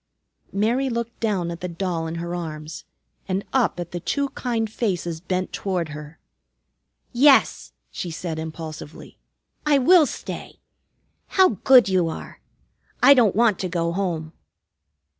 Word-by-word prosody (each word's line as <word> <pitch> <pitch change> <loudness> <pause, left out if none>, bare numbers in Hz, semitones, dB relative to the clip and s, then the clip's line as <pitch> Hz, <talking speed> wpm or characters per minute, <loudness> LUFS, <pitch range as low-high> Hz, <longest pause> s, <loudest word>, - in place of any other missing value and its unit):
Mary 235 +7 +1
looked 235 -1 -4
down 195 -6 -1
at 170 - -8
the 180 - -3
doll 170 -2 -3
in 160 - -5
her 170 +1 -4
arms, 155 -2 -6 0.4
and 190 +1 -2
up 250 -8 +1
at 175 -1 -5
the 175 - -4
two 280 - -1
kind 230 -4 -2
faces 175 -8 -2
bent 185 +1 -3
toward 180 -5 -2
her. 150 +1 -9 1.0
"Yes," 270 +3 +4 0.2
she 175 - -5
said 160 0 -5
impulsively, 160 -1 -8 0.4
"I 300 -2 +4
will 315 +3 +6
stay. - - -7 0.7
How 375 -1 +4
good 245 +3 +5
you 185 -3 +2
are! - - -8 0.6
I 280 - +9
don't 230 -8 +3
want 225 -3 +3
to 185 - -2
go 170 -1 -1
home." 170 -4 -3
185 Hz, 140 wpm, -23 LUFS, 165-235 Hz, 1.0 s, I